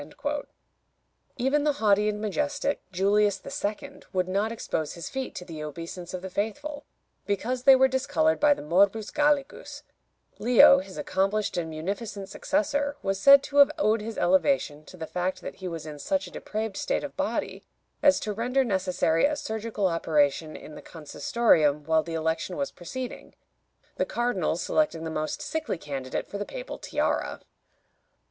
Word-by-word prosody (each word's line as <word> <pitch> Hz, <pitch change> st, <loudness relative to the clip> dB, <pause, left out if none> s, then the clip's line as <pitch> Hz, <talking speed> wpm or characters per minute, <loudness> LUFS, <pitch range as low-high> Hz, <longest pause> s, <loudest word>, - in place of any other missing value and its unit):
" -, -, -46 dB
Even 270 Hz, +4 st, +1 dB
the 300 Hz, -1 st, +2 dB
haughty 210 Hz, -5 st, +3 dB
and 210 Hz, 0 st, -3 dB
majestic 285 Hz, +6 st, -1 dB
Julius 200 Hz, +2 st, +2 dB, 0.2 s
II. 215 Hz, +8 st, -4 dB
would 185 Hz, -1 st, 0 dB
not 200 Hz, +4 st, 0 dB
expose 160 Hz, -9 st, -3 dB
his 170 Hz, -2 st, -7 dB
feet 265 Hz, -1 st, -4 dB
to 180 Hz, -, -6 dB
the 160 Hz, -3 st, -7 dB
obeisance 165 Hz, +3 st, -7 dB
of 180 Hz, -, -7 dB
the 190 Hz, -, -5 dB
faithful, 285 Hz, +10 st, -3 dB, 0.4 s
because 230 Hz, +5 st, -1 dB
they 270 Hz, -1 st, +9 dB
were 265 Hz, 0 st, +5 dB
discolored 280 Hz, +4 st, +1 dB
by 295 Hz, -1 st, +5 dB
the -, -, -9 dB
Morbus 200 Hz, +7 st, +2 dB
Gallicus: 295 Hz, -2 st, 0 dB, 0.6 s
Leo, 250 Hz, +4 st, +7 dB
his 280 Hz, -, -9 dB
accomplished 215 Hz, -7 st, 0 dB
and 170 Hz, -2 st, -2 dB
munificent 195 Hz, +5 st, -5 dB
successor, 285 Hz, +3 st, -1 dB
was 195 Hz, 0 st, -1 dB
said 275 Hz, +6 st, +8 dB
to 285 Hz, -, -4 dB
have 285 Hz, -1 st, +8 dB
owed 215 Hz, +1 st, +2 dB
his 220 Hz, +1 st, -6 dB
elevation 180 Hz, -, +2 dB
to 185 Hz, -, -13 dB
the 160 Hz, -, -5 dB
fact 180 Hz, +3 st, -3 dB
that -, -, -7 dB
he 190 Hz, -, -6 dB
was 165 Hz, -3 st, -5 dB
in 150 Hz, -1 st, -8 dB
such 190 Hz, +5 st, -1 dB
a 175 Hz, -, -11 dB
depraved 215 Hz, -2 st, -4 dB
state -, -, -1 dB
of -, -, -6 dB
body -, -, -2 dB, 0.4 s
as 285 Hz, -1 st, +5 dB
to 210 Hz, -, -2 dB
render 250 Hz, +5 st, +1 dB
necessary 185 Hz, -6 st, +1 dB
a 300 Hz, +1 st, +1 dB
surgical 220 Hz, -5 st, -3 dB
operation 155 Hz, -3 st, +1 dB
in 155 Hz, -, -10 dB
the -, -, -10 dB
Consistorium 150 Hz, -2 st, +1 dB
while 160 Hz, 0 st, +3 dB
the 165 Hz, +1 st, -6 dB
election 160 Hz, +3 st, -2 dB
was 280 Hz, 0 st, -2 dB
proceeding, 250 Hz, +8 st, -7 dB, 0.6 s
the -, -, +1 dB
cardinals 200 Hz, -9 st, -1 dB
selecting 300 Hz, -, +1 dB
the 160 Hz, -, -4 dB
most 155 Hz, -, -3 dB
sickly 310 Hz, -, -3 dB
candidate 135 Hz, -4 st, -4 dB
for 200 Hz, -, -6 dB
the -, -, -1 dB
papal -, -, -7 dB
tiara. -, -, -1 dB
205 Hz, 165 wpm, -27 LUFS, 170-270 Hz, 0.6 s, they